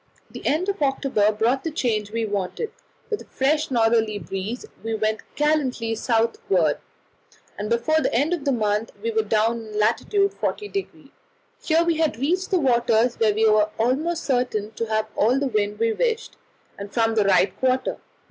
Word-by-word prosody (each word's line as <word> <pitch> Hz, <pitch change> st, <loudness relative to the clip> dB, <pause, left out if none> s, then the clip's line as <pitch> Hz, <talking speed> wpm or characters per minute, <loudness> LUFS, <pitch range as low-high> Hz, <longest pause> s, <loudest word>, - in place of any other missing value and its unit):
The -, -, -9 dB
end 325 Hz, +6 st, +1 dB
of 400 Hz, -3 st, -2 dB
October 270 Hz, -6 st, +2 dB
brought 230 Hz, +5 st, 0 dB
the 325 Hz, -, -1 dB
change 225 Hz, -9 st, -1 dB
we 230 Hz, 0 st, -1 dB
wanted; 205 Hz, -, -3 dB, 0.4 s
with 430 Hz, -, -1 dB
a -, -, -12 dB
fresh 300 Hz, +3 st, 0 dB
northerly 225 Hz, -3 st, +2 dB
breeze 200 Hz, +4 st, -5 dB, 0.2 s
she 225 Hz, 0 st, -2 dB
went 215 Hz, 0 st, 0 dB, 0.2 s
gallantly 275 Hz, -7 st, 0 dB
southward, 225 Hz, -, +1 dB, 0.8 s
and 210 Hz, +1 st, -4 dB
before 275 Hz, +7 st, +2 dB
the -, -, 0 dB
end 290 Hz, +8 st, +1 dB
of 335 Hz, -5 st, -3 dB
the 280 Hz, -, +1 dB
month 215 Hz, -2 st, 0 dB
we 230 Hz, -, 0 dB
were 220 Hz, 0 st, +2 dB
down 220 Hz, +2 st, +1 dB
in 215 Hz, -1 st, -8 dB
lat. 215 Hz, +2 st, +3 dB
40°. 395 Hz, -5 st, -2 dB, 0.5 s
Here 325 Hz, +1 st, +2 dB
we 335 Hz, -2 st, +1 dB
had 315 Hz, -8 st, +1 dB
reached 350 Hz, +9 st, 0 dB
the 380 Hz, -, +2 dB
waters 240 Hz, -3 st, +2 dB
where 215 Hz, -2 st, +3 dB
we 220 Hz, +1 st, +3 dB
were 215 Hz, 0 st, +4 dB
almost 295 Hz, +9 st, 0 dB
certain 245 Hz, -5 st, 0 dB
to 230 Hz, +1 st, -4 dB
have 220 Hz, 0 st, 0 dB
all 235 Hz, +5 st, +3 dB
the 280 Hz, -, 0 dB
wind 210 Hz, -4 st, -1 dB
we 225 Hz, 0 st, +1 dB
wished, 465 Hz, -, -1 dB, 0.4 s
and 200 Hz, 0 st, -7 dB
from 225 Hz, 0 st, +1 dB
the 215 Hz, -2 st, +2 dB
right 185 Hz, -1 st, +3 dB
quarter. 260 Hz, 0 st, +1 dB
230 Hz, 175 wpm, -23 LUFS, 215-295 Hz, 0.8 s, were